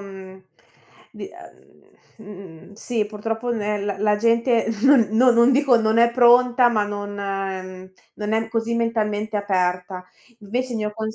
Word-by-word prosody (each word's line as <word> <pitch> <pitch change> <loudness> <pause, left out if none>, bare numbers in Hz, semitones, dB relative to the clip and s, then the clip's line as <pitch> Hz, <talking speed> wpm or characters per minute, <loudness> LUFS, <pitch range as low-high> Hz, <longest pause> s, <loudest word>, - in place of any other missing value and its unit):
mhmm 190 -1 -12 0.7
di - - -9
ehm - - -19 0.2
mhmm 195 -5 -13
sì, 220 0 -3
purtroppo 225 +3 -4
nè 210 -1 -2
l 200 0 -3
la 210 0 +2
gente, 230 +1 +1 0.2
non 270 -5 +5
no, 250 +3 +4
non 235 +2 +4
dico 270 -2 +3
non 220 0 +1
è 235 0 +4
pronta, 245 0 +4
ma 215 -3 0
non 205 0 -6 1.0
non 210 0 -5
è 225 0 -1
così 225 0 -2
mentalmente 215 -2 -2
aperta. 180 -2 -2 0.3
Invece 245 +5 -4
il 225 - -3
mio 210 0 -3
cons 220 0 -5
220 Hz, 150 wpm, -21 LUFS, 205-235 Hz, 1.0 s, non